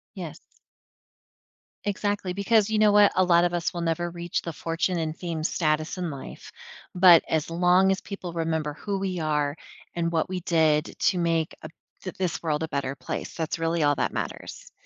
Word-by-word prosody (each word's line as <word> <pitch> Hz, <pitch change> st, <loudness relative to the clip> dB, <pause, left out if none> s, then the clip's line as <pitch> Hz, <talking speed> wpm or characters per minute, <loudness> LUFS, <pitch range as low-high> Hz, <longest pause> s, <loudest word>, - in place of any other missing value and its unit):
Yes. -, -, -7 dB, 1.5 s
Exactly, 205 Hz, -2 st, -2 dB
because 200 Hz, +2 st, +2 dB
you 220 Hz, -1 st, +1 dB
know 215 Hz, -1 st, +5 dB
what? 205 Hz, 0 st, +6 dB
A 185 Hz, -, +4 dB
lot 170 Hz, -1 st, +4 dB
of 175 Hz, 0 st, +1 dB
us 170 Hz, -2 st, -1 dB
will 175 Hz, -, -4 dB
never 170 Hz, +1 st, -1 dB
reach 170 Hz, 0 st, -3 dB
the 170 Hz, -, -6 dB
fortune 165 Hz, +3 st, -1 dB
and 160 Hz, -1 st, -2 dB
fame 165 Hz, -3 st, -4 dB
status 155 Hz, 0 st, 0 dB
in 180 Hz, -2 st, -2 dB
life, 140 Hz, -3 st, -9 dB, 0.4 s
but 180 Hz, -2 st, +8 dB
as 160 Hz, -1 st, 0 dB
long 180 Hz, +3 st, +4 dB
as 190 Hz, -, -1 dB
people 185 Hz, -4 st, -7 dB
remember 160 Hz, -3 st, -1 dB
who 200 Hz, +6 st, -4 dB
we 190 Hz, -2 st, -2 dB
are 150 Hz, -2 st, 0 dB, 0.4 s
and 170 Hz, -1 st, -1 dB
what 160 Hz, -2 st, 0 dB
we 185 Hz, -1 st, -3 dB
did 160 Hz, -2 st, +2 dB
to 185 Hz, -, +2 dB
make 165 Hz, -2 st, 0 dB
a -, -, -8 dB, 0.3 s
th 185 Hz, -, -6 dB
this 185 Hz, -3 st, -2 dB
world 155 Hz, -2 st, -1 dB
a -, -, -2 dB
better 140 Hz, -2 st, -2 dB
place, -, -, -5 dB
that's 160 Hz, 0 st, -3 dB
really 165 Hz, 0 st, 0 dB
all 145 Hz, 0 st, +3 dB
that -, -, -1 dB
matters, -, -, -6 dB
170 Hz, 190 wpm, -26 LUFS, 160-185 Hz, 1.5 s, but